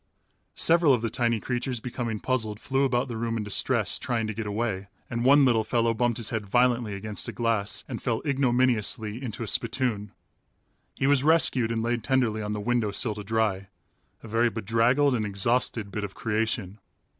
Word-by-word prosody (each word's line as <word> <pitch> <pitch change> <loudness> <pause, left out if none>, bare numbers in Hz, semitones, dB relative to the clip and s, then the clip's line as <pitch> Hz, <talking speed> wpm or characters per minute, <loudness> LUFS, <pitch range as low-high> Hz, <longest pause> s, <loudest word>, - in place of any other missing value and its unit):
Several 165 -5 +4
of 115 - -5
the 115 - -1
tiny 115 -2 +1
creatures 125 +1 -3
becoming 115 -2 -4
puzzled 110 -5 -2
flew 135 +1 0
about 125 0 0
the 115 -2 -5
room 115 0 -2
in 110 - -2
distress, 105 +2 0
trying 120 -4 -1
to 110 - -3
get 110 0 -5
away, 105 -2 -2 0.2
and 120 0 -2
one 140 +2 +6
little 115 -3 +3
fellow 115 +1 +1
bumped 120 0 0
his 115 -4 -2
head 110 -3 -3
violently 120 -1 +2
against 105 +1 -4
a - - -3
glass 115 -3 -1
and 120 -4 -6
fell 115 -4 -1
ignominiously 120 -5 +1
into 120 -3 -5
a - - -5
spittoon. 115 -3 0 0.8
He - - -1
was 140 -1 +3
rescued 145 -7 +3
and 115 -1 -1
laid 120 0 -1
tenderly 125 -5 +1
on 105 0 -3
the 105 - -3
window 120 0 0
sill 105 +2 -1
to 105 0 -7
dry, 105 -2 0 0.6
a - - -9
very 115 +2 +2
bedraggled 115 +6 +2
and 115 -3 0
exhausted 105 +1 0
bit 105 +1 -4
of 100 -2 -6
creation. 110 -2 -2
115 Hz, 190 wpm, -26 LUFS, 105-125 Hz, 0.8 s, one